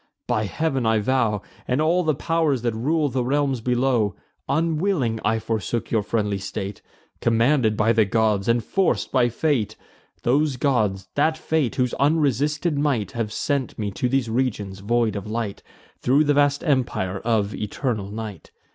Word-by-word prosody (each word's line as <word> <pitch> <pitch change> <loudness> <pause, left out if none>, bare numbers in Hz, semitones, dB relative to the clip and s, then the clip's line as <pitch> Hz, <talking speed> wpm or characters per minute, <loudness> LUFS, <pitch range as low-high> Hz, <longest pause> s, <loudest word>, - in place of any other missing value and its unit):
By 110 0 0
Heav'n, 135 +4 -1
I 110 -1 +3
vow, 110 -3 +1 0.2
And 125 +3 +1
all 165 +4 +3
the 155 -3 +1
pow'rs 155 -5 0
that 120 -2 0
rule 150 +7 +1
the 130 -1 -1
realms 135 -1 0
below, 125 -3 +1 0.3
Unwilling 155 - +1
I 110 +2 +2
forsook 110 +1 -3
your 110 - +2
friendly 105 -2 -1
state, 95 +1 -5 0.4
Commanded 115 -1 +2
by 110 +2 +3
the 110 -1 +4
gods, 105 -1 +1
and 115 0 +2
forc'd 195 - 0
by 125 -2 +3
fate. 120 -5 0 0.5
Those 140 +2 +2
gods, 105 -9 0
that 155 +2 +2
fate, 160 -5 0
whose 125 -2 0
unresisted 150 +1 +1
might 140 -8 0
Have 115 -4 -3
sent 140 +2 -2
me 105 -2 -2
to 125 +5 -1
these 135 -2 +1
regions 110 -5 -2
void 115 +1 +1
of 100 0 -5
light, 110 -3 -3 0.4
Thro' 135 +5 +3
the 145 -1 +2
vast 145 0 +2
empire 120 - 0
of 110 -3 0
eternal 105 -1 -3
night. 105 -4 -7
120 Hz, 160 wpm, -23 LUFS, 110-145 Hz, 0.5 s, the